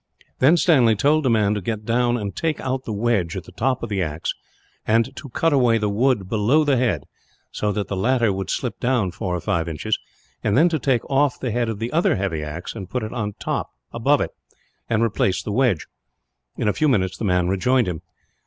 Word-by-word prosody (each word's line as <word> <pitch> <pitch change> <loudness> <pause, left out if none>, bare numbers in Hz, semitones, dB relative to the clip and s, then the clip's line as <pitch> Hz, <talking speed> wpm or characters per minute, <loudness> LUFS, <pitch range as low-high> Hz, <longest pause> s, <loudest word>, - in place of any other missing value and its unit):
Then 150 +7 +5
Stanley 130 -10 +4
told 150 +8 +2
the 130 - +2
man 105 -3 +3
to 105 - -2
get 110 +2 -4
down 120 +1 +2
and 100 -3 -5
take 160 -2 -1
out 130 0 -3
the - - -4
wedge, 105 -5 0
at - - -5
the - - -14
top 130 +1 -1
of 115 - -3
the 100 -2 -1
axe; 80 -2 -2 0.5
and 115 +1 +1
to 140 - -9
cut 165 +6 +1
away 125 -4 +4
the 105 -2 0
wood 115 -2 +1
below 110 +9 +2
the 145 -2 +2
head, 115 - +1 0.5
so 105 - -1
that 105 0 -2
the 100 - -3
latter 115 +1 +2
would 95 -1 -4
slip - - -2
down, 120 -7 +1
four 90 0 -3
or - - -2
five 85 0 -1
inches; 100 +7 -2 0.4
then 145 +12 +3
to 160 -2 -1
take 125 -3 0
off 140 0 +1
the 125 - -2
head 120 0 0
of 110 - -3
the 115 +3 -4
other 170 +3 +3
heavy 95 -6 -2
axe 75 +4 -6
and 95 -5 -8
put 125 -3 -2
it 110 - -5
on 105 -4 -3 0.6
above - - +2
it, - - -2 0.6
and 115 -1 +2
replace 100 -4 0
the 105 - -4
wedge. 115 -7 +1 0.7
In - - -1
a 105 - +3
few 155 - +1
minutes, 95 -7 +1
the - - -4
man 90 -2 +2
rejoined 120 +6 +2
him. 85 -3 -3
115 Hz, 220 wpm, -22 LUFS, 100-130 Hz, 0.7 s, Then